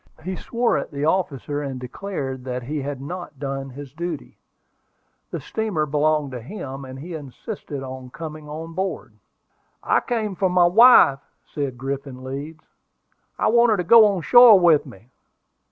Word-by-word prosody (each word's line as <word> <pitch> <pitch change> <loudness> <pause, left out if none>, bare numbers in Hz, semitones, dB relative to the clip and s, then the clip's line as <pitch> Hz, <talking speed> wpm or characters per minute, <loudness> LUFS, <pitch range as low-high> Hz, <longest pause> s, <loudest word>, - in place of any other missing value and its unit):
He 185 +2 -4
swore 235 -5 0
at - - -6
the 140 +1 -3
officer, 150 -4 -1
and 135 -3 -5
declared 135 -1 -5
that 125 -1 -4
he 145 +4 -4
had 140 0 -5
not 170 +2 -7
done 135 -1 -4
his 135 0 -10
duty. 170 +2 -6 0.9
The - - -4
steamer 210 -9 -2
belonged 150 -1 0
to 125 -2 -6
him, 135 - -7
and 130 0 -9
he 165 +6 -8
insisted 145 - -7
on 130 -1 -8
coming 155 +1 -8
on 160 +2 -7
board. 190 +3 -4 0.7
"I - - +3
came 225 -4 -2
off 190 - -9
for 190 - +2
my 180 -1 +4
wife," 190 - +7 0.3
said 140 -4 -4
Griffin 135 0 -5
Leeds. 145 +4 -7 0.7
"I - - +1
want 235 +1 +4
her 215 - +3
to 180 - -1
go 220 +5 +7
on 195 -5 -1
shore 240 -2 +8
with 165 -4 +4
me." 120 0 -15
150 Hz, 170 wpm, -22 LUFS, 135-185 Hz, 0.9 s, shore